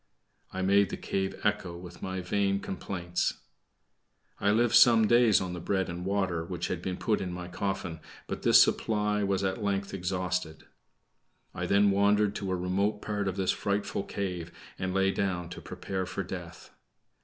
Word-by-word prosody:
I 95 0 -3
made 100 0 +4
the - - -4
cave 95 0 -2
echo 95 -4 -1
with 90 0 -11
my 95 0 -3
vain 100 +2 +1
complaints. 90 -3 -2 1.0
I 100 - +2
lived 115 +2 +3
some 115 -1 +7
days 120 -2 +5
on 90 -1 -4
the 90 - -5
bread 95 +2 -1
and 85 +1 -5
water 95 -4 0
which 85 0 -4
had 90 - -3
been 90 0 -3
put 110 -2 0
into 90 -2 -4
my 90 0 -6
coffin, 95 -3 -3 0.3
but - - -5
this - - +7
supply 105 -1 +2
was 100 -1 0
at 95 +1 -1
length 100 -1 -1
exhausted. 90 -3 -2 0.9
I - - -3
then 100 0 +4
wandered 100 +1 +3
to 100 -3 -3
a - - +1
remote 95 +4 -1
part 105 -2 -2
of 95 - -1
this 95 -2 +1
frightful 100 0 -1
cave 90 -5 -4 0.3
and 95 -1 -1
lay 95 +1 +2
down 90 -4 -2
to 90 - -8
prepare 95 0 -4
for 100 +2 -3
death. 85 -2 -8
95 Hz, 175 wpm, -29 LUFS, 90-100 Hz, 1.0 s, some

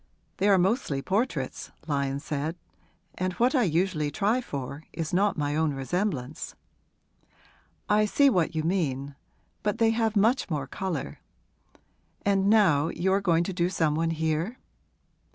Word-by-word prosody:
'They 200 +2 +2
are 195 - +6
mostly 185 - +1
portraits,' 185 - -2 0.2
Lyon 140 -2 -1
said; 150 +2 -3 0.6
'and 185 0 -1
what 245 - +2
I 265 - +3
usually 170 -5 +1
try 210 - +1
for 140 - -6
is 160 0 -4
not 200 +2 +2
my 145 -1 -1
own 155 -2 +1
resemblance.' 140 - -3 1.3
'I 210 +1 +4
see 280 +7 +4
what 180 - +2
you 155 - 0
mean. 145 -6 -1 0.5
But 210 +1 -1
they 225 -1 +4
have 225 -1 0
much 225 +5 +2
more 150 -4 -2
colour. 160 - -4 1.1
And 200 -1 +3
now 180 -9 +4
you 190 +3 0
are 200 - +2
going 170 -3 +2
to 190 - -4
do 175 0 +1
some 160 -5 +1
one 165 +2 0
here?' 160 +7 -1
175 Hz, 150 wpm, -27 LUFS, 150-205 Hz, 1.3 s, are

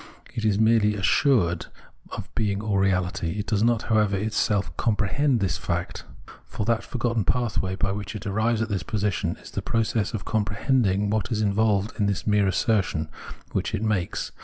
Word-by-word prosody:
It 115 - -4
is 105 -2 +3
merely 110 -1 +4
assured 95 - +2 0.4
of - - -7
being 105 -4 0
all 105 -2 +1
reality; 90 -2 0
it 105 - -2
does 105 -2 0
not, 115 -1 +2
however, 105 -3 +2
itself 105 -5 0
com 115 -3 +1
prehend 125 +5 +1
this 95 - 0
fact; 85 0 -3 0.4
for 105 - -5
that 115 0 +1
forgotten 115 -3 -1
pathway 105 -5 0
by 95 0 0
which 100 +1 -5
it 105 0 -7
arrives 110 +2 +1
at 110 - -4
this 100 -4 -1
position, 100 -1 -1
is - - -13
the - - -3
process 110 -1 0
of 100 - -5
compre 105 -1 -1
hending 105 -6 +2
what 110 +3 -1
is 110 -2 0
involved 105 0 +1
in 100 - +2
this 100 -2 -1
mere 105 -2 +3
assertion 95 -5 0 0.4
which 95 +3 -1
it 105 - -3
makes. 105 -5 -1
105 Hz, 185 wpm, -25 LUFS, 95-110 Hz, 0.4 s, merely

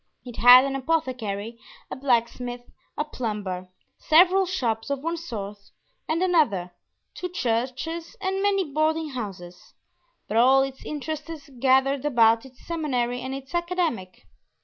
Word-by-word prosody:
It 245 -2 -9
had 250 +2 +9
an 275 0 -2
apothecary, 250 -7 -2 0.3
a - - -3
blacksmith, 245 -1 -1 0.3
a 300 - -1
plumber, 205 -9 -4 0.3
several 365 +4 +5
shops 235 -10 -2
of 280 -1 -3
one 335 +1 -1
sort 210 -11 -6 0.5
and 330 +3 +1
another, 235 - +2 0.4
two 360 - -5
churches, 260 +4 -3
and 385 0 -2
many 395 -1 +2
boarding 310 +1 0
houses; 190 -8 -8 0.5
but 220 - -1
all 265 +3 +6
its 270 -1 -6
interests 305 0 -6
gathered 265 +1 +3
about 230 -3 +3
its 255 -1 -20
seminary 250 -7 -2
and 260 +1 -4
its 270 +2 -10
academy. 345 - -1
265 Hz, 130 wpm, -25 LUFS, 235-320 Hz, 0.5 s, had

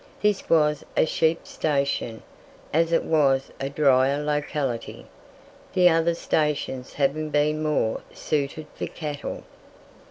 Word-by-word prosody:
This 210 -2 0
was 150 -3 +3
a - - +5
sheep 160 +1 +1
station, 140 -6 -1 0.5
as 165 +2 +2
it 165 - +3
was 135 -4 +2
a 135 - -2
drier 140 0 +3
locality, 145 -4 -2 0.7
the 180 -2 +6
other 165 0 +2
stations 150 -6 -1
having 150 +2 0
been 150 +1 +1
more 150 -8 0
suited 150 +1 -2
for - - -4
cattle. 150 -3 -5
150 Hz, 120 wpm, -25 LUFS, 140-160 Hz, 0.7 s, the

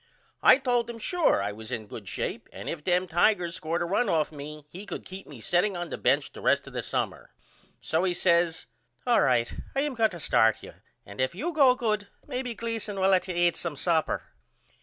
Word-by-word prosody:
I - - +8
told 245 -3 0
him 235 - -6
Sure 330 - +2
I 100 - -1
was 110 +1 -9
in 110 -2 -3
good - - -9
shape - - -4
and - - -9
if 155 -3 -4
them 180 +1 +2
Tigers 175 0 +2
scored 165 +2 -2
a - - -1
run 200 +8 +1
off 155 -2 +1
me 150 0 -8
he 180 +6 -9
could 190 - -6
keep 190 +1 -9
me 135 - -11
setting 175 - +1
on 175 -1 -4
the - - -3
bench - - +2
the - - -10
rest - - +2
of - - -11
the - - -2
summer. - - -3 0.5
So 160 +2 0
he 180 -2 +1
says 170 -2 +2 0.4
All 240 -2 +4
right 120 -2 +2 0.2
I 270 - +2
am 295 -1 -1
going 225 -2 +3
to 175 -4 -8
start 110 -7 +3
you - - -10 0.3
and 100 +5 -6
if 130 +5 0
you 330 - -3
go 270 -5 +6
good 215 -4 -1 0.2
maybe 250 -2 -4
Gleason 225 -3 -4
will 190 0 +3
let 185 0 +3
you 180 - -3
eat 175 0 +3
some 170 -4 -4
supper. 160 +2 0
180 Hz, 225 wpm, -27 LUFS, 160-225 Hz, 0.5 s, I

